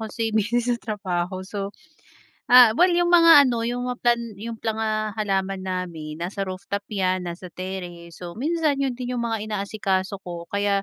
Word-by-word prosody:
kasi 225 0 -3
busy 220 +3 +2
sa 240 0 0
trabaho. 185 -3 -3
So, 200 -1 -4 0.8
ah, 245 -3 +9
well 360 +1 +5
yung 345 0 +2
mga 330 -5 +8
ano 235 -2 -1
yung 245 +1 -2
mga 250 - -3
plan 240 -1 +3 0.2
yung 230 +1 -6
planga 215 -1 -2
halaman 195 -2 -1
namin 170 -5 -5
nasa 190 +3 -3
rooftop 195 +2 -4
yan 185 -2 0
nasa 175 +2 -7
terrace, 175 -2 -7
so 175 -1 -8
minsan 310 0 +1
yun 270 -2 0
din 250 0 -4
yung 235 - -1
mga 225 -2 -2
inaasikaso 200 -1 -2
ko 170 -1 -6
kaya, 200 -1 +1
205 Hz, 170 wpm, -24 LUFS, 185-240 Hz, 0.8 s, ah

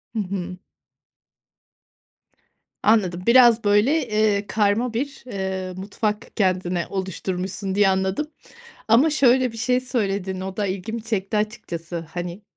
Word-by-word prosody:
Hı - - 0
hı. 185 -2 -4 2.3
Anladım, 185 -5 +2
biraz 235 -1 +6
böyle, 235 +8 +3 0.3
ııı, 200 0 -3
karma 220 +4 +1
bir, 275 +4 -4
ııı, 190 -4 -4
mutfak 210 +3 -3
kendine 185 -3 0
oluşturmuşsun 190 0 -3
diye 205 -1 +5
anladım 190 +9 0 0.6
ama 255 +8 +5
şöyle 255 -4 +3
bir 230 - -10
şey 250 +2 +1
söyledin, 200 -7 -2
o 190 0 -5
da 210 - 0
ilgimi 200 +4 -4
çekti 215 -2 -2
açıkçası. 170 -6 -4
Hani, 175 +3 -5
200 Hz, 120 wpm, -23 LUFS, 185-230 Hz, 2.3 s, biraz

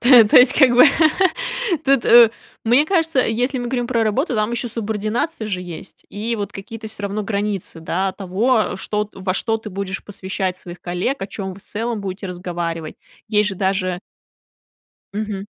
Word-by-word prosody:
То 245 -2 +8
то - - +5
есть, 250 +1 +7
как 270 -4 +6
бы, 245 +4 +7 1.0
тут, 275 -3 +3 0.6
мне 245 +6 +4
кажется, 325 -7 +2
если 250 +3 0
мы 245 - -3
говорим 245 -1 -1
про 235 -2 +1
работу, 245 - 0
там 215 +1 0
еще 235 +1 -2
субординация 220 +5 -2
же 185 -3 -2
есть 175 0 -9
и 225 +3 -3
вот 205 -1 -4
какие-то 220 +3 -8
всё 215 -1 -11
равно 200 +1 -2
границы, 200 -4 -3
да, 185 +4 -1
того, 210 +5 0
что 210 +2 -2
во 190 -1 -3
что 225 +2 0
ты 220 -1 -9
будешь 190 0 -4
посвящать 190 -2 -3
своих 175 -1 -10
коллег, 180 +10 -2
о 195 - -3
чем 195 -1 -5
вы 195 - -13
в - - -17
целом 225 +1 -3
будете 195 0 -5
разговаривать. 175 -3 -4 0.3
Есть 210 -1 +3
же - - -5
даже 185 -1 -1 1.1
Мгм. 205 -2 -4
210 Hz, 175 wpm, -20 LUFS, 190-235 Hz, 1.1 s, То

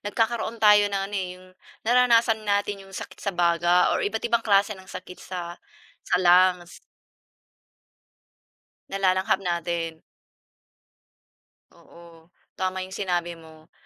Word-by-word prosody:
nagkakaroon 225 +2 -2
tayo 210 -2 +5
ng 200 - -3
ano 205 - -14
eh, 190 -2 -1
'yong, 185 0 -17 0.4
nararanasan 235 -2 +3
natin 205 -1 -1
'yong 195 0 -12
sakit - - -9
sa 200 -3 -4
baga, 175 +1 +3
or - - 0
iba't 220 +3 -3
ibang 235 -1 +2
klase 200 0 +3
ng 190 -2 -14
sakit 180 -1 -10
sa 175 -1 -7 0.5
sa - - +3
lungs. 180 0 +3 2.1
Nalalanghap 190 0 +1
natin. 170 -2 -3 1.7
Oo, 170 -1 -18 0.3
tama 185 0 -2
'yong 185 - -11
sinabi 175 -3 -2
mo, 160 +1 -17
185 Hz, 120 wpm, -25 LUFS, 175-205 Hz, 2.1 s, tayo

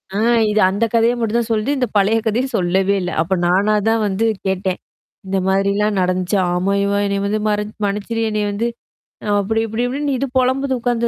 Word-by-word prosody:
ஆ - - 0 0.3
இது 210 0 +1
அந்த 200 +4 0
கதையா 230 +1 +3
மட்டும் 230 0 0
தான் 235 -1 -3
சொல்லது, 220 +4 0
இந்த 250 -2 0
பழைய 205 +3 +3
கதையும் 245 +4 -1
சொல்லவே 190 +2 +1
இல்ல. 180 0 -3
அப்ப 170 +4 -1
நானா 195 +4 +2
தான் 225 0 +2
வந்து 200 +3 0 0.2
கேட்டேன். 190 -1 -1 0.5
இந்த 195 +1 -1
மாதிரிலாம் 200 +2 +1
நடந்துச்சு. 185 +2 0 0.2
ஆம 185 +3 0
யுவா! 200 0 +1
என்னைய 200 0 -1
வந்து 210 +2 0
மற்ச 210 0 0 0.2
மனுச்சிரு 210 +3 -2
என்னைய 210 -1 -1
வந்து, 225 +4 -1 0.7
அப்டி 220 +3 0
இப்டி 225 +3 -2
இப்டி 280 +3 -2
இது 275 - -1
பொலம்புது 260 +1 +1
உட்காந்து. 235 0 0
210 Hz, 185 wpm, -19 LUFS, 195-230 Hz, 0.7 s, கதையா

